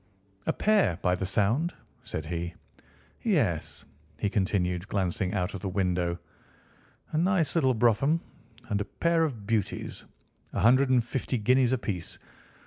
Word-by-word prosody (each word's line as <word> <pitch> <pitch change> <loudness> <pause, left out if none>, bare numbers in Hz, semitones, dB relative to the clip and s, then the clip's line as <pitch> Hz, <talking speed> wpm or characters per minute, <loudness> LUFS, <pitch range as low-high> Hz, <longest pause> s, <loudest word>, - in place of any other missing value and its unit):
"A - - +4
pair, 205 - +3
by 90 - +3
the 95 +1 -1
sound," 115 - +1 0.3
said 80 - -5
he. 85 +1 -4 0.7
"Yes," - - 0 0.3
he 100 +5 -1
continued, 90 -2 0
glancing 95 -2 -1
out 90 0 -1
of 100 - -4
the 95 - -3
window. 90 -2 0 0.9
"A 155 - +1
nice 180 -2 +2
little 130 -7 +3
brougham 120 +8 +3 0.5
and 105 -2 0
a - - -2
pair 165 +9 +1
of 120 -10 -3
beauties. 105 -2 -2 0.5
A - - -1
hundred 130 +3 +5
and 125 -2 +4
fifty 125 +2 -2
guineas 125 +3 +3
apiece. 105 -9 -3
105 Hz, 140 wpm, -28 LUFS, 90-130 Hz, 0.9 s, hundred